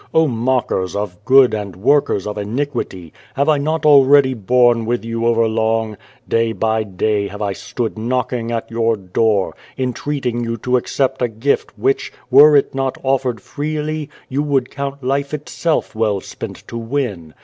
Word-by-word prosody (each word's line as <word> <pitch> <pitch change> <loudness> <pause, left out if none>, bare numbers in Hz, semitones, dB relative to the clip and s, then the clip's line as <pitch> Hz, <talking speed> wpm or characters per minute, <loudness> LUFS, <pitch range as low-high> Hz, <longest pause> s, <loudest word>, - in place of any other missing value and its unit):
O 160 0 +5
mockers 120 -6 -1
of 100 -1 -4
good 130 -1 +6
and 100 -4 -4
workers 120 -1 +2
of 105 - -4
iniquity! 105 - -4 0.2
have 140 +2 +1
I 150 -2 +3
not 155 +3 -1
already 140 -2 +6
borne 120 0 +2
with 120 -1 -1
you 115 0 -1
over 115 -1 +3
long? 110 0 0 0.3
Day 115 0 +1
by 110 0 0
day 105 0 -1
have 105 +2 -6
I 100 -1 -1
stood 115 +2 -4
knocking 120 0 -2
at 115 0 -3
your 115 -1 +1
door, 100 +1 0 0.2
entreating 130 -1 -2
you 115 0 -3
to 125 +3 0
accept 130 +2 -1
a 125 - +3
gift 115 +5 -1
which, 135 - 0 0.2
were 145 +3 +8
it 140 - +3
not 135 -1 -2
offered 130 -4 0
freely, 150 +2 -4 0.2
you 135 +2 -1
would 140 -4 0
count 140 0 -5
life 140 +3 -1
itself 155 +2 -2
well 110 -3 0
spent - - -9
to 115 - -5
win. 115 - -3
120 Hz, 165 wpm, -18 LUFS, 110-140 Hz, 0.3 s, were